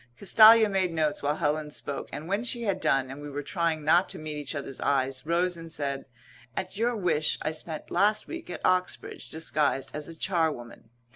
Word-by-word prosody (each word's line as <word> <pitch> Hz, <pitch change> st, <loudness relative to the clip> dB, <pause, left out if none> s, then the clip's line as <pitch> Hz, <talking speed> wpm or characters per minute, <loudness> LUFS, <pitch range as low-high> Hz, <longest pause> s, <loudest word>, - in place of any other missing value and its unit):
Castalia 220 Hz, +2 st, +8 dB
made 190 Hz, -3 st, 0 dB
notes 155 Hz, -2 st, 0 dB
while 145 Hz, +1 st, 0 dB
Helen 150 Hz, 0 st, -1 dB
spoke, 145 Hz, -1 st, -5 dB
and 150 Hz, +3 st, -6 dB
when 200 Hz, +5 st, 0 dB
she 240 Hz, -1 st, -1 dB
had 195 Hz, -4 st, -1 dB
done, 130 Hz, -1 st, +1 dB
and 140 Hz, +2 st, -8 dB
we 145 Hz, -, -7 dB
were 145 Hz, +1 st, -5 dB
trying 165 Hz, -2 st, -1 dB
not 170 Hz, +4 st, +4 dB
to 190 Hz, -, -2 dB
meet 155 Hz, -2 st, -5 dB
each 145 Hz, 0 st, -4 dB
other's 135 Hz, -2 st, -6 dB
eyes, 135 Hz, 0 st, 0 dB
rose 175 Hz, +2 st, +1 dB
and 165 Hz, -1 st, -9 dB
said, 140 Hz, -3 st, -3 dB, 0.5 s
"At 190 Hz, 0 st, -4 dB
your 235 Hz, +3 st, +1 dB
wish 165 Hz, -7 st, +1 dB
I 155 Hz, -, 0 dB
spent 155 Hz, 0 st, -5 dB
last 210 Hz, +1 st, +2 dB
week 335 Hz, 0 st, -8 dB
at -, -, -5 dB
Oxbridge, 185 Hz, 0 st, -1 dB
disguised 150 Hz, -4 st, -1 dB
as 150 Hz, 0 st, -4 dB
a 165 Hz, -, -9 dB
charwoman. 160 Hz, -11 st, -2 dB
160 Hz, 200 wpm, -28 LUFS, 145-190 Hz, 0.5 s, Castalia